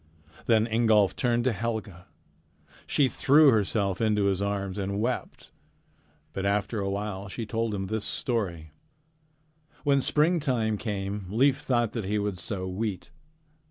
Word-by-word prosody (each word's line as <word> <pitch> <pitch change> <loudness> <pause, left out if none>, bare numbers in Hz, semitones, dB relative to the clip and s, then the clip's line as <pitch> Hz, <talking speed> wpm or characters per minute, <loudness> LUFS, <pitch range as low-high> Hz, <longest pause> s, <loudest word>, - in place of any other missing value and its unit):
Then 110 -2 +4
Ingolf 110 -4 +3
turned 120 -2 +1
to 130 - +2
Helga. 110 -4 -4 0.8
She 140 - +3
threw 145 +3 +5
herself 100 -3 0
into 105 -2 +2
his 100 -1 +1
arms 100 -1 -2
and 100 +1 -2
wept. 120 +3 -3 0.8
But 95 - -3
after 105 +2 0
a 100 -1 -1
while 100 0 -4
she 115 +3 -5
told 115 -1 -2
him 95 -1 -3
this 110 +2 -3
story: 90 - -3 1.1
"When 140 -2 +3
springtime 135 - +1
came, 100 -3 -4
Leif 135 +6 +3
thought 120 -6 0
that 115 -4 -4
he 105 +2 0
would 100 -3 -2
sow 95 0 -4
wheat. 100 +4 -4
105 Hz, 140 wpm, -27 LUFS, 100-120 Hz, 1.1 s, threw